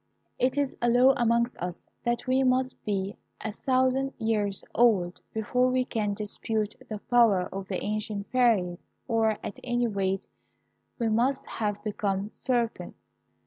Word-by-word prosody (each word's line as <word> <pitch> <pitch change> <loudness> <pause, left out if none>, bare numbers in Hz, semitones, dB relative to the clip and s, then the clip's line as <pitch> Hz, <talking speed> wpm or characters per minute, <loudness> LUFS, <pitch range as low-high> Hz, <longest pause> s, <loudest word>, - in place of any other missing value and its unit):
"It 260 +2 +1
is 285 -2 0
a 240 - +3
law 250 +3 +6
amongst 235 -1 +2
us 180 0 -5 0.2
that 240 -1 0
we 260 +1 +2
must 255 0 +1
be 200 -1 -2 0.2
a 215 - -4
thousand 260 +3 +1
years 210 -3 0
old 200 -7 +3
before 250 +4 +1
we 255 0 +1
can 210 -5 -1
dispute 215 0 -2 0.2
the 215 - -3
power 225 -3 +4
of 195 0 -5
the 190 -2 -3
ancient 210 -1 -2
fairies, 215 -8 +2 0.3
or 225 -3 +2
at - - -6
any 240 -1 +1
rate 195 -3 -1 0.7
we 235 - 0
must 245 +5 +1
have 205 -2 -3
become 205 -1 -2
serpents. 240 -3 -2
225 Hz, 145 wpm, -28 LUFS, 205-250 Hz, 0.7 s, law